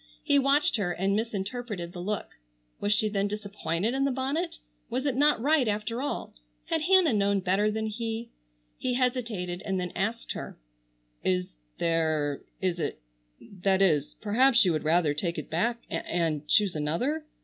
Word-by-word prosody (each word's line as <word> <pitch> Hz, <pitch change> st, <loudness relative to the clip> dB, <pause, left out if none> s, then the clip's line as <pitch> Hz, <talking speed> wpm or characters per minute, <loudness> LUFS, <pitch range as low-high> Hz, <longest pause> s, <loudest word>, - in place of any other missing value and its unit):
He 285 Hz, -2 st, +4 dB
watched 280 Hz, +3 st, +3 dB
her 180 Hz, -4 st, 0 dB
and 195 Hz, +3 st, +1 dB
misinterpreted 210 Hz, -3 st, -3 dB
the 180 Hz, -, -7 dB
look. 205 Hz, +3 st, -2 dB, 0.5 s
Was 205 Hz, -, 0 dB
she 215 Hz, +1 st, +3 dB
then 200 Hz, -1 st, 0 dB
disappointed 205 Hz, -1 st, -2 dB
in 270 Hz, +1 st, +1 dB
the 275 Hz, -, +3 dB
bonnet? 285 Hz, +6 st, -2 dB, 0.3 s
Was 255 Hz, +4 st, -2 dB
it 275 Hz, -4 st, +1 dB
not 290 Hz, -1 st, +4 dB
right 285 Hz, 0 st, +3 dB
after 215 Hz, +3 st, -1 dB
all? 285 Hz, -, -3 dB, 0.3 s
Had 325 Hz, -1 st, 0 dB
Hannah 360 Hz, -4 st, +5 dB
known 200 Hz, -1 st, +2 dB
better 195 Hz, +3 st, +2 dB
than 220 Hz, +1 st, -2 dB
he? 225 Hz, +1 st, -4 dB, 0.5 s
He 250 Hz, -1 st, 0 dB
hesitated 230 Hz, -9 st, -1 dB
and 190 Hz, -2 st, -1 dB
then 180 Hz, -1 st, -3 dB
asked 225 Hz, +5 st, -2 dB
her: -, -, -6 dB, 0.7 s
"Is 90 Hz, -6 st, 0 dB, 0.2 s
there—— 155 Hz, -4 st, 0 dB, 0.2 s
Is 180 Hz, -2 st, 0 dB
it—— -, -, -2 dB, 0.6 s
That 195 Hz, 0 st, +3 dB
is—perhaps 210 Hz, -, +3 dB
you 180 Hz, -, +3 dB
would 155 Hz, -, -1 dB
rather 160 Hz, -1 st, +3 dB
take 170 Hz, +3 st, -2 dB
it 155 Hz, -, -6 dB
back 230 Hz, +9 st, 0 dB
and -, -, -3 dB
and 160 Hz, -4 st, -1 dB
choose 205 Hz, +1 st, +3 dB
another. 170 Hz, -, -1 dB
210 Hz, 165 wpm, -28 LUFS, 175-250 Hz, 0.7 s, Hannah